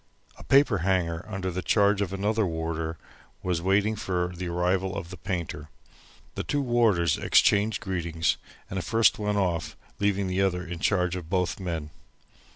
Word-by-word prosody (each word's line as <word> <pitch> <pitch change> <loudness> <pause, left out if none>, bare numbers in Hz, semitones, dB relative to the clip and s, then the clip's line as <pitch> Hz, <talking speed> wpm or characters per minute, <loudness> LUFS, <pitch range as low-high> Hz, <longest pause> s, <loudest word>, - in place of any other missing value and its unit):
A - - -13
paper 135 -8 +4
hanger 85 -2 0
under 95 -3 -3
the 90 +1 -3
charge 100 +4 +3
of 95 -3 -1
another 105 +3 0
warder 80 -2 -3 0.5
was 90 -2 0
waiting 100 +4 +2
for 90 -3 -2
the 90 +1 -4
arrival 90 +2 0
of 90 -3 -6
the - - -6
painter. 80 -3 -4 0.6
The - - -3
two 145 -1 -1
warders 115 -9 +2
exchanged 105 +2 +3
greetings, 85 -4 -1 0.3
and 95 - -3
the - - -2
first 115 +4 +3
went 105 -1 0
off 85 -5 -1 0.2
leaving 100 -1 +1
the 95 +1 0
other 90 -2 0
in 85 -1 -6
charge 90 -2 +1
of 85 -3 -7
both 90 0 0
men. 85 -5 -4
95 Hz, 165 wpm, -27 LUFS, 85-100 Hz, 0.6 s, paper